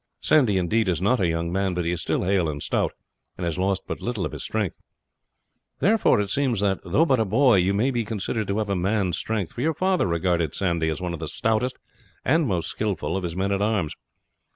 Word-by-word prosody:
Sandy, 130 -11 +3
indeed 100 +3 +1
is 85 -4 0
not 110 +7 +2
a 95 - +2
young 85 0 -1
man, 95 0 0
but 90 -1 -1
he 85 - +1
is 90 -1 -3
still - - -1
hale 90 -3 +1
and 75 -1 -4
stout, - - 0 0.4
and 90 - -3
has 85 +1 -2
lost 95 0 0
but - - -5
little 115 -6 -2
of - - -4
his - - -7
strength. 105 -5 -2 1.0
Therefore 215 - +3
it 100 -1 -1
seems 130 -5 +1
that, 100 -2 +1
though 130 - +2
but 130 -6 +2
a - - +4
boy, 120 +2 +4
you 90 +1 +3
may 125 +7 +2
be 120 -2 0
considered 110 0 -3
to 100 - -1
have 110 -2 -1
a - - +1
man's 95 -1 0
strength, 105 -7 -3
for 120 - -5
your 160 +3 +1
father 185 - +1
regarded 85 -2 0
Sandy 85 -4 0
as 80 - -3
one 90 -1 -3
of 85 - -5
the 80 - -4
stoutest 110 +8 0 0.5
and 160 -2 +3
most 90 -6 -1
skilful 100 -6 -2
of 95 - -1
his 85 -2 -4
men 95 +2 0
at 100 0 0
arms. 105 -7 0
100 Hz, 235 wpm, -24 LUFS, 90-110 Hz, 1.0 s, a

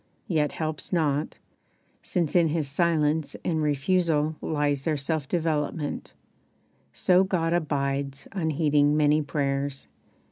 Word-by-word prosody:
yet 150 -4 +1
helps 155 -1 -4
not, 155 -4 0 0.6
Since 170 -4 -1
in 170 -2 +5
his 155 -1 -1
silence 155 0 +1
and 160 -2 0
refusal 155 +1 +1
lies 145 -3 0
Their 155 -1 0
self 145 0 -2
development, 155 -2 -2 0.8
so 185 +1 +3
God 170 -3 0
abides 140 -4 -1
Unheeding 150 -4 +2
many 150 0 +4
prayers. 140 -1 -2
150 Hz, 110 wpm, -26 LUFS, 145-165 Hz, 0.8 s, in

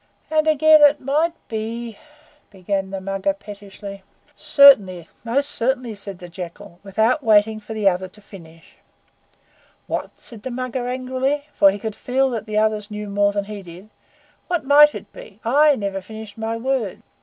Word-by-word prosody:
"And 310 0 +2
again 310 0 +6
it 290 0 +6
might 305 +5 0
be 225 0 -5 0.3
" 295 -1 -33
began 195 0 -3
the 195 0 -5
Mugger 195 0 -2
pettishly. 200 -1 -10 0.3
"Certainly 200 - +5
most 275 +5 0
certainly," 250 -1 -1
said 200 -2 -7
the 180 - -10
Jackal, 175 +1 -10
without 220 +8 0
waiting 215 -1 +3
for 215 +1 -9
the 210 -2 +1
other 185 0 +1
to 200 +3 -12
finish. 165 -5 -16 1.1
"What?" - - -5
said 230 -3 -9
the 260 - -5
Mugger 255 0 -4
angrily, 260 +3 -2
for 195 - +5
he 195 - -2
could 220 +1 -5
feel 265 +1 0
that 225 -3 -4
the 215 0 -2
others 215 -1 0
knew 210 -1 -6
more 200 0 +2
than 200 -1 -2
he 210 -1 -7
did. 185 +4 -13 0.6
"What 350 -5 -2
might 295 +2 +6
it - - -10
be? - - -13
I 290 +5 +4
never 200 -4 -4
finished 220 +1 -10
my 225 0 -3
words. 240 -5 -2
220 Hz, 170 wpm, -21 LUFS, 200-260 Hz, 1.1 s, again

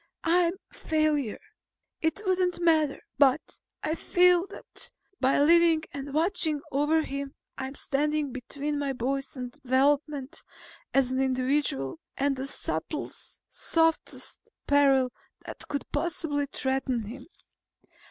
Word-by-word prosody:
I'm 340 +1 +3
a 385 - -29
failure. 305 -7 0 0.6
It 320 +6 0
wouldn't 365 -2 +1
matter. 315 -4 +3 0.2
But 280 +1 +3 0.2
I 310 - 0
feel 360 +2 +4
that - - -3 0.3
by 265 +2 +3
living 330 +1 +5
and 280 0 -6
watching 320 -1 +1
over 295 +3 +2
him 275 -1 -5 0.2
I'm 265 +1 -5
standing 295 +1 0
between 285 +4 -3
my 280 -1 -1
boy's 270 +2 -2
development 275 +3 0 0.5
as 265 -2 +3
an 260 +1 +1
individual, 255 - 0 0.2
and 275 0 +1
the 265 +1 -3
subtlest, - - -4
softest 325 -1 0 0.3
peril 275 -3 +4 0.3
that - - -7
could 285 - -3
possibly 290 -2 -1
threaten 265 -3 -1
him. 245 +6 -9
285 Hz, 115 wpm, -28 LUFS, 265-320 Hz, 0.6 s, living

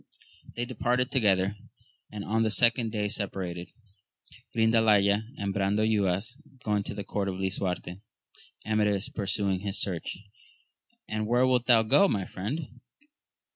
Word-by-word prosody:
They 120 - -2
departed 125 0 0
together, 100 -4 +2 0.5
and 105 -1 -6
on 110 +2 +1
the 110 - +2
second 115 +1 +3
day 105 -2 -1
separated, 90 -4 -4 0.9
Grindalaya 110 -2 +4
and 100 -1 -2
Brandoyuas 100 +2 +1 0.3
going 105 -1 +1
to - - -5
the 100 - -4
court 100 0 -2
of 95 - -3
Lisuarte; 95 -1 -3 0.6
Amadis 105 -2 +1
pursuing 100 -2 -1
his 100 0 -3
search. 90 -4 -3 0.9
And 110 0 -2
where 120 +2 +3
wilt 125 -1 +2
thou 115 -3 +6
go, 195 - +5
my 100 - -1
friend 125 - -5
105 Hz, 130 wpm, -28 LUFS, 100-115 Hz, 0.9 s, thou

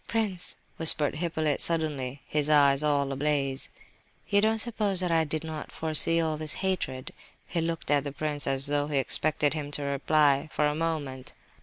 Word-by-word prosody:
"Prince," 200 -5 -2 0.2
whispered 155 -3 +5
Hippolyte, 160 -3 -1
suddenly, 145 -5 -1
his 150 -1 0
eyes 140 -2 +4
all 145 -2 0
ablaze, 135 -1 -1 0.6
"you 200 0 +3
don't 220 +1 +2
suppose 215 -4 -1
that 180 -2 -1
I 165 -1 +2
did 155 +1 -2
not 155 -2 -7
foresee 160 +1 +1
all 160 -2 -1
this 155 -1 -2
hatred?" 130 -9 -3 0.3
He 170 - -3
looked 165 -2 -3
at 145 -1 +3
the 145 - -5
prince 145 0 -1
as 135 0 +2
though 145 0 0
he 150 -2 -1
expected 150 +2 +2
him 150 -2 -5
to 145 0 -4
reply, 140 +1 +1
for 150 - 0
a 150 - +1
moment. 150 -5 -4
150 Hz, 175 wpm, -27 LUFS, 140-165 Hz, 0.6 s, whispered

